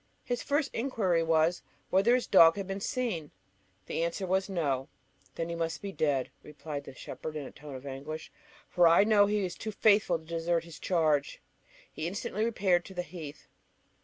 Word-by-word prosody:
His 245 Hz, -2 st, -2 dB
first 290 Hz, 0 st, 0 dB
inquiry 215 Hz, -9 st, +1 dB
was, 165 Hz, +1 st, +2 dB, 0.3 s
whether 200 Hz, +6 st, +5 dB
his 250 Hz, -, 0 dB
dog 165 Hz, -4 st, +7 dB
had 200 Hz, -1 st, -4 dB
been 195 Hz, +1 st, -4 dB
seen? 210 Hz, -, -2 dB, 0.6 s
The -, -, -3 dB
answer 170 Hz, +3 st, -2 dB
was, 190 Hz, +2 st, 0 dB
No. 140 Hz, -8 st, -1 dB, 0.5 s
"Then 165 Hz, -, -2 dB
he -, -, -3 dB
must 165 Hz, -1 st, -2 dB
be 200 Hz, -, -5 dB
dead," 140 Hz, -8 st, 0 dB
replied 150 Hz, -1 st, -7 dB
the 135 Hz, -, -10 dB
shepherd 155 Hz, +4 st, -7 dB
in 150 Hz, -2 st, -4 dB
a -, -, -9 dB
tone 145 Hz, -1 st, -10 dB
of 130 Hz, +1 st, -9 dB
anguish, 145 Hz, +4 st, -6 dB, 0.4 s
"for 175 Hz, -1 st, +4 dB
I 170 Hz, +4 st, +6 dB
know 205 Hz, -1 st, +5 dB
he 210 Hz, 0 st, 0 dB
was 180 Hz, -2 st, -3 dB
too 215 Hz, -, -5 dB
faithful 205 Hz, -4 st, +3 dB
to 160 Hz, -, -17 dB
desert 165 Hz, +1 st, -1 dB
his 165 Hz, -2 st, -11 dB
charge." 155 Hz, -5 st, +1 dB, 0.5 s
He 155 Hz, -, -3 dB
instantly 200 Hz, +3 st, -3 dB
repaired 190 Hz, -6 st, +2 dB
to 190 Hz, -, -11 dB
the 180 Hz, -, -2 dB
heath. 160 Hz, -4 st, -9 dB
170 Hz, 190 wpm, -30 LUFS, 155-200 Hz, 0.6 s, dog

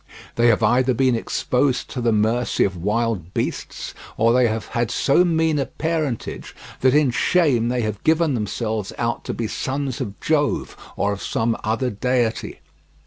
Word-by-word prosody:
They 120 Hz, +1 st, +3 dB
have 115 Hz, -1 st, +3 dB
either 125 Hz, +3 st, +3 dB
been 130 Hz, 0 st, +3 dB
exposed 125 Hz, +3 st, 0 dB
to 125 Hz, -, -4 dB
the 115 Hz, -1 st, +2 dB
mercy 110 Hz, +3 st, +1 dB
of 95 Hz, -2 st, 0 dB
wild 105 Hz, -1 st, -2 dB
beasts, -, -, -3 dB, 0.2 s
or 115 Hz, +1 st, +4 dB
they 125 Hz, -1 st, +4 dB
have 110 Hz, -1 st, -3 dB
had 120 Hz, -1 st, -1 dB
so 140 Hz, +7 st, +3 dB
mean 160 Hz, -3 st, +1 dB
a 135 Hz, -, -1 dB
parentage 155 Hz, -6 st, -3 dB, 0.2 s
that 130 Hz, +1 st, +3 dB
in 150 Hz, -4 st, +4 dB
shame 130 Hz, -4 st, +2 dB
they 125 Hz, 0 st, 0 dB
have 105 Hz, -2 st, -3 dB
given 160 Hz, -1 st, +3 dB
themselves 110 Hz, -2 st, -2 dB
out 120 Hz, 0 st, -2 dB
to -, -, -3 dB
be 115 Hz, -, -2 dB
sons 135 Hz, +2 st, -3 dB
of 100 Hz, 0 st, -5 dB
Jove 145 Hz, -2 st, 0 dB, 0.2 s
or 100 Hz, 0 st, 0 dB
of 100 Hz, -, -7 dB
some 115 Hz, 0 st, 0 dB
other 115 Hz, +4 st, 0 dB
deity. 120 Hz, +1 st, -1 dB
120 Hz, 170 wpm, -22 LUFS, 110-135 Hz, 0.2 s, or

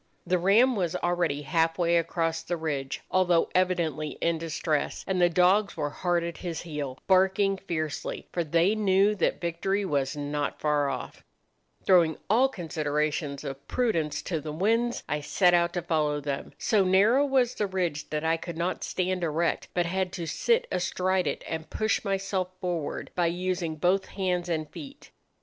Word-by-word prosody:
The 180 Hz, 0 st, +1 dB
ram 225 Hz, +8 st, +4 dB
was 175 Hz, -5 st, -1 dB
already 175 Hz, -5 st, 0 dB
half 165 Hz, +2 st, +1 dB
way 170 Hz, -1 st, +2 dB
across 165 Hz, -1 st, 0 dB
the 175 Hz, -, -3 dB
ridge, 145 Hz, -4 st, -3 dB
although 180 Hz, -2 st, +3 dB
evidently 170 Hz, -5 st, 0 dB
in 165 Hz, -1 st, 0 dB
distress, 155 Hz, -2 st, -2 dB
and 185 Hz, -1 st, 0 dB
the 175 Hz, -, +5 dB
dogs 185 Hz, +4 st, +3 dB
were 145 Hz, -2 st, -2 dB
hard 175 Hz, +1 st, 0 dB
at 170 Hz, -1 st, -5 dB
his 170 Hz, -3 st, -4 dB
heel, 145 Hz, -5 st, -5 dB
barking 190 Hz, +1 st, +3 dB
fiercely, 155 Hz, -6 st, -4 dB
for 175 Hz, -, 0 dB
they 170 Hz, +5 st, +2 dB
knew 200 Hz, -1 st, +3 dB
that 200 Hz, -, 0 dB
victory 190 Hz, +4 st, -1 dB
was 140 Hz, -3 st, -1 dB
not 145 Hz, 0 st, -3 dB
far 150 Hz, -2 st, +1 dB
off. 130 Hz, -2 st, -6 dB, 0.6 s
"Throwing 170 Hz, -4 st, +4 dB
all 255 Hz, +5 st, +5 dB
considerations 150 Hz, -, -2 dB
of 135 Hz, 0 st, -7 dB
prudence 160 Hz, -12 st, 0 dB
to 165 Hz, -4 st, -2 dB
the 150 Hz, -, -5 dB
winds, 230 Hz, +9 st, 0 dB
I 150 Hz, +1 st, -1 dB
set 175 Hz, +4 st, +3 dB
out 170 Hz, 0 st, +3 dB
to 175 Hz, -, -2 dB
follow 150 Hz, -2 st, 0 dB
them. 140 Hz, -1 st, -4 dB
So 210 Hz, -3 st, +2 dB
narrow 200 Hz, +9 st, +4 dB
was 260 Hz, -3 st, +2 dB
the 210 Hz, -, -1 dB
ridge 175 Hz, -6 st, -2 dB
that 150 Hz, 0 st, -2 dB
I 165 Hz, 0 st, +2 dB
could 165 Hz, 0 st, -7 dB
not 170 Hz, +2 st, -2 dB
stand 185 Hz, -1 st, -1 dB
erect, 165 Hz, +1 st, 0 dB
but 175 Hz, -1 st, +2 dB
had 185 Hz, +1 st, -1 dB
to 170 Hz, -, -4 dB
sit 470 Hz, -, +1 dB
astride 185 Hz, 0 st, 0 dB
it, 140 Hz, -, -3 dB
and 160 Hz, -1 st, -5 dB
push 215 Hz, 0 st, 0 dB
myself 195 Hz, -2 st, -1 dB
forward 175 Hz, -5 st, -3 dB
by 175 Hz, -1 st, +1 dB
using 175 Hz, -1 st, -2 dB
both 180 Hz, +5 st, +1 dB
hands 180 Hz, -2 st, -2 dB
and 155 Hz, -2 st, -1 dB
feet. 280 Hz, -, -11 dB
175 Hz, 170 wpm, -27 LUFS, 155-190 Hz, 0.6 s, the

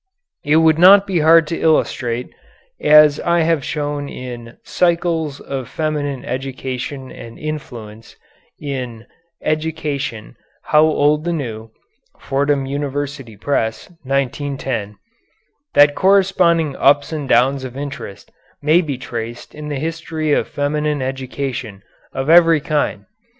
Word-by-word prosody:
It 150 Hz, +1 st, +2 dB
would 160 Hz, -1 st, +4 dB
not 195 Hz, +3 st, +8 dB
be 190 Hz, -4 st, 0 dB
hard 160 Hz, +1 st, +6 dB
to 165 Hz, -, -3 dB
illustrate, 125 Hz, -6 st, 0 dB, 0.5 s
as 150 Hz, -1 st, +6 dB
I 170 Hz, 0 st, +1 dB
have 160 Hz, -3 st, +1 dB
shown 145 Hz, -1 st, -3 dB
in 120 Hz, -2 st, -8 dB
"Cycles 170 Hz, -4 st, 0 dB
of 135 Hz, -3 st, -6 dB
Feminine 145 Hz, -4 st, -3 dB
Education 130 Hz, 0 st, -5 dB
and 115 Hz, 0 st, -11 dB
Influence" 115 Hz, -8 st, -8 dB, 0.4 s
in 125 Hz, -5 st, -5 dB, 0.4 s
"Education, 150 Hz, -, -3 dB, 0.3 s
How 150 Hz, -, +4 dB
Old 150 Hz, -1 st, +2 dB
the 175 Hz, -, -1 dB
New" 115 Hz, -7 st, -5 dB, 0.5 s
(Fordham 140 Hz, 0 st, 0 dB
University 140 Hz, -4 st, -4 dB
Press, 115 Hz, -, -2 dB
1910), 135 Hz, -5 st, -2 dB, 0.8 s
that 145 Hz, 0 st, +6 dB
corresponding 180 Hz, -5 st, +3 dB
ups 145 Hz, +2 st, +3 dB
and 145 Hz, -4 st, -4 dB
downs 130 Hz, +3 st, +3 dB
of 130 Hz, 0 st, -7 dB
interest 140 Hz, -8 st, -7 dB, 0.3 s
may 155 Hz, +4 st, +3 dB
be 145 Hz, -6 st, -4 dB
traced 120 Hz, -1 st, -7 dB
in 150 Hz, 0 st, -8 dB
the 145 Hz, -, -3 dB
history 160 Hz, 0 st, -3 dB
of -, -, +1 dB
feminine 150 Hz, 0 st, -1 dB
education 130 Hz, -5 st, -5 dB, 0.3 s
of 135 Hz, +1 st, -4 dB
every 165 Hz, -1 st, +6 dB
kind. 150 Hz, 0 st, -2 dB
145 Hz, 120 wpm, -18 LUFS, 130-155 Hz, 0.8 s, not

